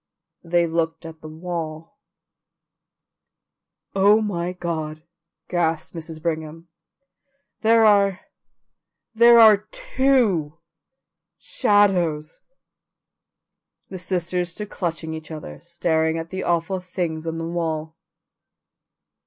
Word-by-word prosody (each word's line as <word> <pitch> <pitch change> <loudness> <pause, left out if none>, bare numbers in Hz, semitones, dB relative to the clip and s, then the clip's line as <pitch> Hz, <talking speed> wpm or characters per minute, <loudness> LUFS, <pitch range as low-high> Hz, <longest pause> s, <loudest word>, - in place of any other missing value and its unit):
They 170 0 +2
looked 165 0 -2
at 160 -1 -10
the 155 - -9
wall. 160 -1 -6 2.0
"Oh, 200 +2 +5
my 180 -5 -2
God," 160 -3 -4 0.4
gasped 165 -2 -1
Mrs. 160 -1 -7
Brigham, 160 0 -4 0.9
"there 225 0 +4
are 200 -3 +4 0.9
there 235 +1 +7
are 215 -2 +6
TWO 215 - +1 0.8
shadows." 190 - +1 1.5
The 185 - -7
sisters 180 0 -1
stood 210 +4 -7
clutching 165 -3 -3
each 160 0 -8
other, 155 - -8
staring 160 -2 0
at 165 +1 -6
the 190 0 -4
awful 175 +2 0
things 170 -3 -4
on 165 0 -3
the 165 - -4
wall. 160 -2 -3
170 Hz, 95 wpm, -22 LUFS, 160-190 Hz, 2.0 s, there